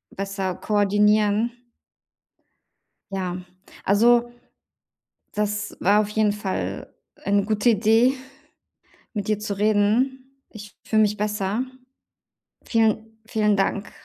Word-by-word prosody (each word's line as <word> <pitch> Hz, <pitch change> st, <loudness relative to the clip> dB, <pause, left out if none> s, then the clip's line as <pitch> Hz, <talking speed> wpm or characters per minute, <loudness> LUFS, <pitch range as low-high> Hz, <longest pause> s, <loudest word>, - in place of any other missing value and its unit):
besser 195 Hz, -1 st, -3 dB
koordinieren. 210 Hz, +2 st, +2 dB, 1.6 s
Ja. 185 Hz, -2 st, -3 dB, 0.5 s
Also, 235 Hz, +4 st, +4 dB, 1.0 s
das 210 Hz, 0 st, -2 dB
war 205 Hz, +3 st, +4 dB
auf 210 Hz, -, -1 dB
jeden 210 Hz, 0 st, +1 dB
Fall 205 Hz, -2 st, -4 dB, 0.2 s
eine 200 Hz, 0 st, 0 dB
gute 215 Hz, +3 st, +2 dB
Idee, 225 Hz, +4 st, +4 dB, 1.0 s
mit 205 Hz, -2 st, -4 dB
dir 215 Hz, -1 st, +1 dB
zu 210 Hz, -1 st, -4 dB
reden. 250 Hz, +6 st, +1 dB
Ich 210 Hz, -2 st, -12 dB
fühle 220 Hz, -1 st, +3 dB
mich 210 Hz, 0 st, +1 dB
besser. 210 Hz, +2 st, -1 dB, 1.0 s
Vielen, 220 Hz, -1 st, 0 dB
vielen 215 Hz, -3 st, +1 dB
Dank. 200 Hz, +1 st, -1 dB
210 Hz, 100 wpm, -23 LUFS, 205-220 Hz, 1.6 s, Also